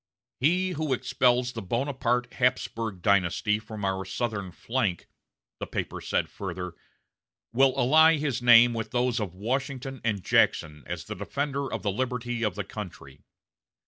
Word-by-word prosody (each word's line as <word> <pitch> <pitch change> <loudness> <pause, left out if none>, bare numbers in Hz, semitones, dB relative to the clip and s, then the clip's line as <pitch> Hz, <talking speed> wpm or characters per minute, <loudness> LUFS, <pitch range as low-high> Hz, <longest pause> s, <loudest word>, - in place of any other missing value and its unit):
'" 125 - -68
"He 185 +2 0
who 155 -4 -1
expels 125 -1 +2
the 115 - -6
Bonaparte 125 +2 -1
Hapsburg 115 -6 -1
dynasty 100 +2 +2
from 110 -2 -6
our 95 0 -1
southern 100 -1 -3
flank," 110 -3 -2 0.5
the - - -4
paper - - -4
said - - 0
further, 90 -2 -6 0.8
"will 135 +2 +3
ally 160 +5 +6
his 140 -4 -2
name 120 0 +7
with 115 -1 -3
those 125 -1 0
of 95 -5 -4
Washington 130 +4 -3
and 105 -5 -1
Jackson 75 -2 +2
as 85 -2 -5
a - - -4
defender 140 +7 -3
of - - -4
the 100 - +1
liberty 120 +1 -2
of 105 -5 0
the 100 - -3
country. 85 -9 -9
120 Hz, 150 wpm, -27 LUFS, 100-130 Hz, 0.8 s, name